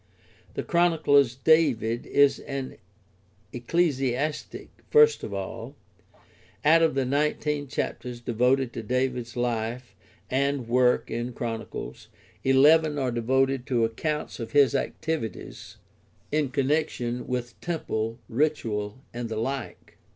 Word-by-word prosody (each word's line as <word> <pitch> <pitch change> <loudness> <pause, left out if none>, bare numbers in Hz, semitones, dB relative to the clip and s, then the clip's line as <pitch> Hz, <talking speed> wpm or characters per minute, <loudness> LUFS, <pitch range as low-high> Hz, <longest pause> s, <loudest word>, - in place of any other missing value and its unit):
The - - -2
Chronicler's 155 -7 +3
David 130 -6 +2
is 140 -1 +4
an 135 -2 -6 0.8
ecclesiastic 135 +1 -1 0.2
first 455 0 +5
of - - -5
all; - - -6 0.9
out 165 +2 +6
of 160 -3 +2
the 135 -1 +1
nineteen 145 +1 0
chapters 125 -1 -4
devoted 125 +2 +1
to - - -4
David's 125 0 -2
life 120 0 -2 0.3
and 140 -1 0
work 125 +1 +2
in 120 +2 -3
Chronicles 115 - -6 0.4
eleven 150 +3 +5
are 130 -3 0
devoted 130 +3 +1
to 120 -4 +2
accounts 150 +8 -3
of 115 - -6
his 140 -1 +5
activities 145 -2 -4 0.5
in 150 -2 +1
connection 130 -3 -1
with 125 -2 -4
temple, 115 -10 -3
ritual, 115 -5 -1
and 120 -1 -4
the 110 - -4
like. 130 +3 -5
130 Hz, 115 wpm, -26 LUFS, 120-145 Hz, 0.9 s, out